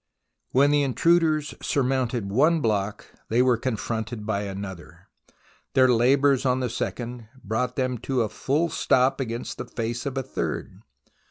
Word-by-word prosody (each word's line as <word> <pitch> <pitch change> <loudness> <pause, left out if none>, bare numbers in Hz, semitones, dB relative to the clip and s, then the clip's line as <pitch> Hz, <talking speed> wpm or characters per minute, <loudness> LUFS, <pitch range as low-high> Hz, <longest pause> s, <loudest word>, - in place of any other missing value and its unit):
When 140 +3 +4
the 145 0 +3
intruders 155 +2 +2
surmounted 125 -6 0
one 155 +9 +4
block, 105 -5 -1 0.2
they 120 +3 +3
were 125 -1 +4
confronted 115 -1 -3
by 105 -1 -1
another. 95 -2 -8 0.7
Their 130 -1 +6
labours 135 +3 +3
on 130 -1 +2
the 125 -3 -2
second 120 -1 -4 0.2
brought 115 +4 -1
them 130 -2 -1
to 130 -3 +2
a - - -1
full 145 +10 0
stop 130 -4 +2
against 120 -2 -4
the - - -4
face 120 +3 -4
of 140 - -4
the 135 - -1
third. - - -4
125 Hz, 150 wpm, -25 LUFS, 115-135 Hz, 0.7 s, Their